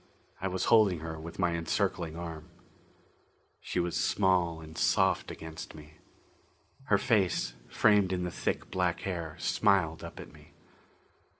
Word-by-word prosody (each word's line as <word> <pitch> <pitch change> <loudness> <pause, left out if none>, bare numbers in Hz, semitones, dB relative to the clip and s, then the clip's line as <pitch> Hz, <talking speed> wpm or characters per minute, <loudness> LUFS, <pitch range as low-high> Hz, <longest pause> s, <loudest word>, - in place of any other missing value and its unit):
I 95 - 0
was 95 0 -2
holding 100 -7 +5
her 80 -1 -5
with 80 +1 -9
my 90 -2 +1
encircling 80 -1 -1
arm. 80 -3 -7 1.1
She - - -3
was 85 0 -1
small 90 -4 +2
and 80 0 -11
soft - - +2
against 80 -1 -8
me. 75 0 -14 0.9
Her 105 - +4
face, 95 - +1 0.2
framed 105 -3 +4
in 90 -1 -1
the 90 - -3
thick, - - -3
black 90 -2 0
hair, 85 -4 -4
smiled 90 -4 +2
up - - -8
at - - -10
me. - - -18
85 Hz, 140 wpm, -30 LUFS, 80-95 Hz, 1.1 s, holding